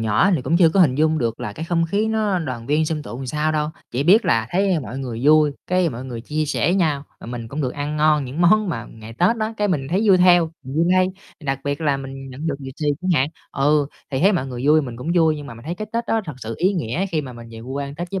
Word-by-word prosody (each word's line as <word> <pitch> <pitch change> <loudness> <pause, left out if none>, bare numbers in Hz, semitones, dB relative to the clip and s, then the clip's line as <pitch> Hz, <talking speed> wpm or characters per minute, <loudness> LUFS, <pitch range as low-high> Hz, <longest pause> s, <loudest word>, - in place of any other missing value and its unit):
nhỏ 110 - +3
thì 145 - -1
cũng 165 - +1
chưa 170 -2 +6
có 190 +4 +2
hình 145 -8 +5
dung 155 +2 +2
được 115 -2 -2
là 105 - -4
cái 160 - -6
không 165 0 +1
khí 205 +6 0
nó 215 -4 +1
đoàn 130 -8 -5
viên, 155 +3 +2
xôm 155 -1 -2
tụ 130 -1 -7
sao 150 +4 0
đâu. 150 -1 0 0.2
Chỉ 125 - -1
biết 195 +9 +5
là 115 -1 +2
thấy 190 -2 +1
mọi 130 -1 -6
người 120 -4 -5
vui, 150 0 +5
cái 180 -1 +2
mọi 125 -2 -6
người 120 -3 -6
chia 150 +6 -2
sẻ 170 +4 +1
nhau, 155 -7 +1 0.2
mà - - -10
mình 120 -1 -6
cũng 145 +6 -4
được 125 -2 -1
ăn 145 +1 -3
ngon 150 -1 +3
những 135 +6 -5
món 210 +4 +4
mà 120 -9 -3
ngày 110 0 -11
Tết 180 - +2
á, 215 +1 -1
cái 210 -1 0
mình 140 -7 -1
thấy 190 +5 +1
vui 190 - +7
theo, 175 -2 +5
mình 130 +1 -7
vui 165 - +3
lây, 185 0 +4 0.4
đặc 135 -1 -1
biệt 145 +1 -2
là 145 -3 +1
mình 135 0 -8
nhận 135 +5 -6
được 155 - 0
lì 135 - -7
xì 150 - -3
chẳng 185 0 -1
hạn. 135 - +1 0.2
Ừ, 145 +1 +2 0.2
thì 130 - -1
thấy 195 +4 +5
mọi 170 -8 -1
người 125 0 -4
vui 155 +1 +5
mình 125 -4 -6
cũng 125 +7 -6
vui, 160 -3 +3
nhưng 145 -1 -8
mà 115 - -9
mình 115 +2 -13
thấy 170 +3 -3
cái 215 +2 -6
Tết 235 +1 -1
đó 225 - +1
thật 155 -5 -6
sự 115 -2 -5
ý 190 +3 +2
nghĩa 170 - -2
khi 165 -5 -1
mà 130 - -8
mình 120 -1 -11
về 115 0 -9
quê 140 0 -4
Tết 175 +2 -5
với 195 - -2
150 Hz, 295 wpm, -21 LUFS, 130-175 Hz, 0.4 s, vui